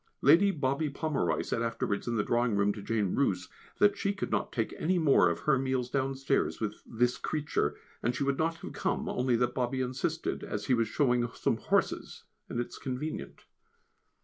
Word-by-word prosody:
Lady 170 +8 +7
Bobby 145 -3 0
Pomeroy 150 +1 -1
said 115 - -2
afterwards 115 -3 -2
in 120 - 0
the 105 - +1
drawing 120 -1 +1
room 100 0 +2
to 105 - -8
Jane 105 -3 0
Roose 90 -10 0 0.3
that 205 0 +5
she 200 0 -1
should - - -3
not - - 0
take 115 -3 -2
any 180 +3 +1
more 140 - +5
of 85 - -3
her 135 -4 +3
meals 130 -2 -1
downstairs 135 0 0
with 105 -1 -3
this 120 +1 +1
"creature;" 150 -1 -1 0.3
and 120 +2 0
she 140 - -1
would 140 -1 0
not 165 +1 +1
have - - -9
come - - -1
only 125 -1 +1
that 125 +1 +1
Bobby 130 +1 -1
insisted, 130 +6 -2
as 105 0 -4
he 130 - +2
was 115 -2 +2
showing 120 -1 +2
some - - 0
horses, - - -1 0.3
and 120 - -3
it 120 - -2
is - - -10
convenient. 135 +4 -5
130 Hz, 195 wpm, -30 LUFS, 115-145 Hz, 0.3 s, Lady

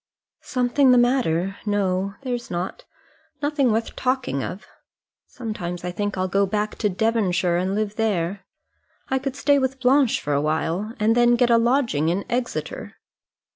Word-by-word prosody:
"Something 255 +2 +2
the 250 - +6
matter! 200 -7 +1
No, 195 -2 0
there's 245 -2 -4
not; 175 +1 -4 0.5
nothing 285 -4 +1
worth 225 +1 -1
talking 255 - -1
of. 190 - -6 0.6
Sometimes 180 -8 -5
I 180 - -3
think 205 +1 -3
I'll 185 0 0
go 195 +2 +1
back 210 +1 -1
to 210 - +1
Devonshire 185 -4 +1
and 185 +2 -1
live 215 0 -2
there. 195 -4 -1 0.7
I 265 - +1
could 270 0 -4
stay 285 0 +3
with 265 0 -1
Blanche 260 0 +3
for 145 -1 -1
a 140 - +2
time, 165 +8 -1
and 215 +2 +3
then 240 0 +5
get 240 0 +3
a 230 - +6
lodging 235 - +1
in 185 +4 -1
Exeter." 245 0 -3
215 Hz, 160 wpm, -23 LUFS, 185-250 Hz, 0.7 s, the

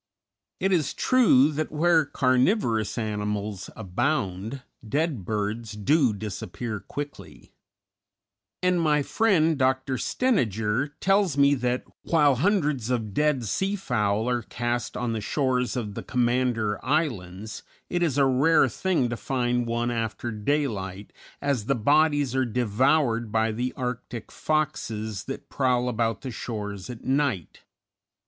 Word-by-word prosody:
It 190 - +1
is 160 -6 +1
true 185 - +4
that 155 +1 -3
where 160 0 +3
carnivorous 130 - +1
animals 105 -3 -3
abound, 110 +2 -2 0.2
dead 140 - -1
birds 105 +2 -2
do 130 +5 +3
disappear 105 +1 -5
quickly; 145 +9 -8 1.1
and 180 -1 +3
my 150 -2 +2
friend 165 -6 +2
Dr. 130 0 +1
Stejneger 120 - 0
tells 195 -6 +2
me 140 0 +5
that, 125 -2 -1 0.2
while 145 -5 +3
hundreds 150 - +1
of 110 -5 -1
dead 150 -2 +1
sea 195 - 0
fowl 110 - 0
are 120 -1 +1
cast 120 0 -3
on 120 -2 -1
the 110 - -2
shores 125 0 0
of 110 -5 -3
the - - -5
Commander 120 -4 0
Islands, 110 - -2 0.3
it 175 - -1
is 155 -6 +1
a 140 - +5
rare 135 +5 +4
thing 180 -9 0
to 120 - -2
find 125 -1 -1
one 120 +1 0
after 115 0 -3
daylight, 105 -5 -2 0.3
as 140 -7 0
the 135 - +2
bodies 145 +2 +3
are 130 - +3
devoured 120 +1 +1
by 110 0 +2
the 125 +3 -2
Arctic 125 -2 -5
foxes 110 -9 -2
that 135 - -6
prowl 125 -2 +1
about 115 -3 -1
the 130 - -5
shores 105 -3 -5
at 120 -2 -8
night. 130 - -1
125 Hz, 130 wpm, -26 LUFS, 110-145 Hz, 1.1 s, me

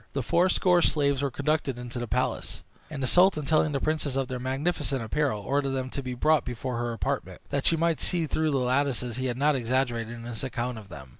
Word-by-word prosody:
The 135 - -1
fourscore 180 +4 +3
slaves 140 -4 +2
were 140 - +1
conducted 140 -1 -1
into 120 0 -6
the 120 - -4
palace; - - -2 0.3
and 145 -4 -5
the - - +2
sultan, 175 0 +4
telling 155 0 +3
the 140 - 0
princess 155 -3 -1
of 135 -2 -1
their 130 -1 -3
magnificent 135 0 -1
apparel, 115 -1 0
ordered 140 +3 0
them 130 -1 -3
to 140 - -3
be 125 -1 -5
brought 155 +5 +3
before 125 0 -4
her 120 0 -1
apartment, 115 - -3
that 140 -1 +1
she 165 - +4
might 165 -1 +1
see 170 -2 +1
through 155 +1 0
the 140 - +1
lattices 125 -2 0
he 130 0 -1
had 120 -1 -2
not 145 +2 +3
exaggerated 120 -2 -1
in 115 - -9
his 120 0 -5
account 125 -2 -3
of 100 -3 -14
them. 70 -6 -10
135 Hz, 225 wpm, -27 LUFS, 120-150 Hz, 0.3 s, sultan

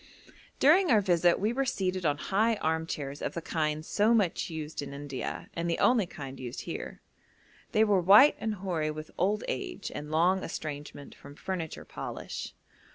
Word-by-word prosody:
During 340 +6 +5
our 225 -5 +6
visit 175 -3 +3
we 215 +4 +1
were 270 +2 +1
seated 185 -8 -1
on 145 -1 +1
high 215 +8 +1
arm 160 -4 -1
chairs 140 -2 -5
of - - -3
the 170 - -3
kind 155 -1 -1
so 215 +6 +3
much 195 -6 +1
used 160 -2 -5
in 140 -1 -7
India, 140 -2 -5
and 170 0 -2
the 165 - 0
only 230 -7 +3
kind 135 -5 -8
used 125 -2 -6
here. - - -6 0.7
They 215 - +4
were 205 -4 +3
white 205 - +8
and 220 -1 -2
hoary 175 -5 -2
with 155 0 -7
old 205 +4 +1
age - - -4
and 150 - -6
long 175 +5 +2
estrangement 145 -3 -6
from 140 +1 -13
furniture 170 -2 -5
polish. - - -6
170 Hz, 175 wpm, -29 LUFS, 150-205 Hz, 0.7 s, white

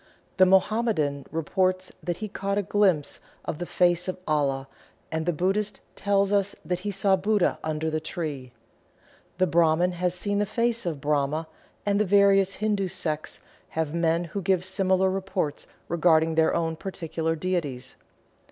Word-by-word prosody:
The 185 -1 +6
Mohammedan 190 -7 +2
reports 185 +4 0
that 175 -1 -3
he 215 - -4
caught 200 0 -2
a 205 - +1
glimpse 185 -7 +1 0.3
of 150 - -4
the 175 - -4
face 175 0 +2
of 185 - -3
Allah, 140 -3 0 0.4
and 160 +1 -2
the - - +4
Buddhist 195 +5 -1 0.2
tells 200 0 +1
us 200 -1 +1
that 180 -1 -1
he 205 +3 -4
saw 195 0 +2
Buddha 205 0 +1
under 155 0 -2
the 155 - 0
tree. 155 -6 -5 0.9
The 185 - +3
Brahman 170 +1 +3
has 180 0 -1
seen 205 +2 -1
the 205 - +1
face 235 -1 0
of 155 -5 -3
Brahma, 150 +2 0 0.4
and 200 0 +2
the 210 - +3
various 195 0 +4
Hindu 205 -2 0
sects 155 -3 -3 0.4
have 160 -2 0
men 170 0 +1
who 175 +4 -5
give 185 0 +1
similar 190 0 +2
reports 190 -6 -3 0.2
regarding 165 -1 +3
their 160 0 +3
own 165 -1 -1
particular 165 -3 -3
deities. 150 -7 -3
180 Hz, 160 wpm, -26 LUFS, 160-195 Hz, 0.9 s, The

